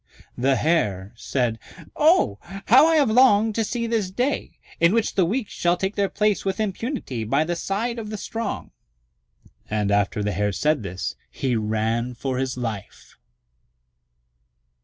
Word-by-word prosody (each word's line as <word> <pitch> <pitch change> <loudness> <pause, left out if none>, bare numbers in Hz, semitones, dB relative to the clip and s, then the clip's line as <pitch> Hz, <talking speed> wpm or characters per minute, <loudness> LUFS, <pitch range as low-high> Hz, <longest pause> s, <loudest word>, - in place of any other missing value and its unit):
The 135 +2 +2
Hare 105 - 0
said, 120 -4 -1 0.4
"Oh, 100 0 +3 0.3
how 265 +8 +7
I 325 - +3
have 285 -7 +3
longed 220 -3 +5
to 225 - 0
see 235 +2 -2
this 225 -5 -1
day, 250 +9 -2 0.2
in 170 +5 +4
which 230 -2 +1
the 185 - +3
weak 215 +5 -1
shall 175 0 0
take 190 +3 -2
their 200 -1 +1
place 210 0 +1
with 195 0 -2
impunity 215 - -3
by 135 +8 +1
the 175 +2 -2
side 225 +7 -2
of 215 -2 -6
the 215 - -4
strong." 225 +1 -5 1.0
And 105 -1 0
after 100 +1 +1
the 105 - -1
Hare 100 +2 -1
said 150 +5 +1
this, 95 -2 -5
he 130 -3 -2
ran 110 +3 -1
for 130 +1 -3
his 130 -1 -2
life. 110 -5 -6
170 Hz, 160 wpm, -23 LUFS, -, 1.0 s, how